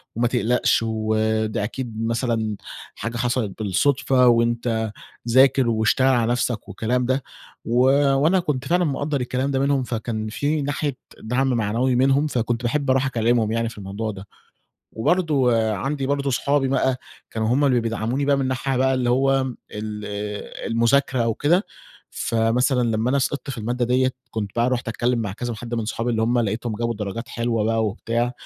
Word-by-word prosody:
وما 120 +2 +2
تقلقش 120 0 +2
وده 110 -1 0
أكيد 115 0 -4
مثلًا 115 -2 -1 0.4
حاجة 115 +3 -4
حصَلِت 120 -4 -1
بالصدفة 125 +5 +2
وأنت 115 -1 +1 0.4
ذاكر 130 0 +5
واشتغل 110 +3 +2
على 120 -3 +3
نفْسك." 120 -2 -1
والكلام 125 +3 -1
ده، 130 +2 0 0.4
و 120 +2 +1 0.4
وأنا 160 +7 +3
كنت 150 -7 -2
فعلًا 175 +1 +2
مقدّر 145 -1 -1
الكلام 130 +2 -1
ده 135 - 0
منهم، 140 -1 +1
فكان 115 -2 -3
في 145 +7 -1
ناحية 145 -1 -2 0.2
دعْم 125 +4 0
معنوي 120 +2 +1
منهم، 135 +4 +3
فكنت 120 -3 -1
باحب 140 +3 0
أرُوح 130 +1 +3
أكلّمهم 115 -3 +1
يعني 115 0 0
في 115 - -13
الموضوع 100 +3 -4
ده. 100 0 -10 0.7
وبرضه 140 -2 +2 0.2
عندي 135 +7 -2
برضه 140 0 0
أصحابي 135 +1 +1
بقى 130 -1 +1 0.3
كانوا 110 -1 -1
هُم 135 +5 +2
اللي 130 -3 +3
بيدعموني 115 +4 -1
بقى 140 0 +3
من 135 -1 0
ناحية 130 +1 -1
بقى 130 +1 +2
اللي 125 -2 0
هو 135 +2 +3 0.4
ال 105 0 -5 0.7
المذاكرة 120 +2 +2
أو 115 -1 0
كده، 170 - +2 0.5
فمثلًا 125 +3 +1
لمّا 110 +2 0
أنا 140 - +2
سقِطت 140 +1 -2
في 130 - -6
المادة 120 +3 -1
دِيّة، 130 +2 +2 0.2
كنت 105 -3 -3
بقى 120 +1 +2
رُحت 125 -1 -2
أتكلّم 120 +2 0
مع 105 -4 -2
كذا 120 +3 -4
حد 120 +2 -6
من 115 -2 -2
صحابي 115 +2 -2
اللي 110 -1 0
هُم 120 +2 +2
لقيتهم 110 +1 -2
جابوا 115 +1 -1
درجات 105 +2 -5
حلوة 115 -2 -1
بقى 115 0 +1
وبتاع، 115 +4 -1
120 Hz, 170 wpm, -22 LUFS, 115-135 Hz, 0.7 s, ذاكر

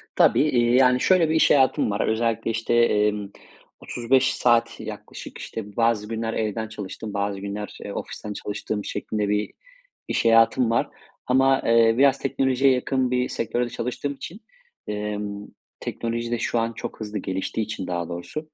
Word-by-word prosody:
Tabii, - - +5
eee, 120 -4 +2
yani, 125 -1 +5
şöyle 180 -4 +4
bir 160 - +1
iş 160 - +5
hayatım 130 -6 +3
var: 100 - 0
Özellikle, 115 0 0
işte, 115 +1 -1
emm, 105 -3 +2 0.5
35 125 +2 +1
saat 120 -1 +2
yaklaşık, - - -8
işte, 105 -2 -7
bazı 115 -2 +2
günler 115 0 -3
evden 110 0 -2
çalıştığım, 105 0 -7
bazı 100 -1 -2
günler, 100 +1 -6
eee, 100 - -6
ofisten 105 -1 -6
çalıştığım 105 0 -4
şeklinde 105 -2 -2
bir 105 0 0 0.6
iş - - -1
hayatım 115 +1 +5
var. 115 - +1 0.4
Ama, 135 +1 +4
eee, 115 -1 +5
biraz 135 0 +5
teknolojiye 135 0 +2
yakın 130 0 0
bir 125 0 +1
sektörde 120 +1 -1
çalıştığım 125 +5 -3
için, 180 +10 -9 0.5
emm, 105 -1 -4 0.3
teknoloji 115 0 -3
de 120 - 0
şu 120 - 0
an 115 0 -1
çok - - -7
hızlı 105 -1 -5
geliştiği 95 +4 -3
için 100 -3 -5
daha 85 -1 -3
doğrusu, 150 - -6
115 Hz, 160 wpm, -24 LUFS, 105-125 Hz, 0.6 s, Tabii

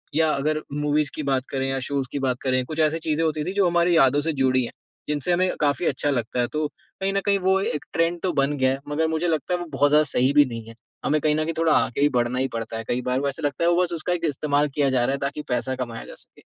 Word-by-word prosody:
या 160 -1 +3
अगर 155 +2 0
मूवीज़ 150 0 +1
की 155 - -3
बात 135 -1 0
करें 135 0 -1
या, 135 0 -1
शोज़ 135 0 -2
की 145 - -3
बात 130 -2 0
करें 130 -1 +1
कुछ 155 +3 -6
ऐसी 155 +1 +2
चीज़ें 160 0 -1
होती 155 -1 -1
थीं 185 - -3
जो 195 -3 +3
हमारी 175 0 +3
यादों 135 0 +5
से 160 +2 -1
जुड़ी 130 -1 +3
हैं, 120 - -5 0.4
जिनसे 150 +4 0
हमें 185 +1 +2
काफ़ी 145 +2 +1
अच्छा 145 0 0
लगता 125 -2 -1
है। 120 - +2
तो 155 0 0
कहीं 195 +5 -6
न 195 - +2
कहीं 200 -1 +3
वो 190 0 +4
एक 150 -6 -2
ट्रेंड 165 +1 +1
तो 185 - +1
बन 145 +1 0
गया 130 -1 +3
है। 135 - -2
मगर 160 +2 +1
मुझे 160 +2 -1
लगता 165 +2 -1
है 175 - 0
वो 175 - -5
बहुत 140 +1 +3
ज़्यादा 150 +1 +6
सही 130 +3 +2
भी 145 0 +6
नहीं 115 -2 -7
है। 115 - -11 0.3
हमें 155 +1 +2
कहीं 150 0 +2
न 155 - 0
कहीं 165 +1 -2
थोड़ा 165 -1 +3
आगे 125 - 0
ही 145 - +5
बढ़ना 120 +1 0
ही 135 - +1
पड़ता 115 0 -4
है। 115 - -5
कई 125 +1 -1
बार 125 +1 0
वो 140 - -1
ऐसे 140 - -5
लगता 145 +2 -1
है - - +4
वो 175 +1 +3
बस 175 -1 -2
उसका 170 +2 -1
एक 170 -1 -2
इस्तेमाल 145 0 +1
किया 145 -2 +2
जा 130 -1 +2
रहा 135 - +1
है 140 - -1
ताकि 145 +2 -5
पैसा 125 +2 -1
कमाया 120 -3 -5
जा - - -10
सके। - - -15
145 Hz, 295 wpm, -24 LUFS, 130-160 Hz, 0.4 s, ज़्यादा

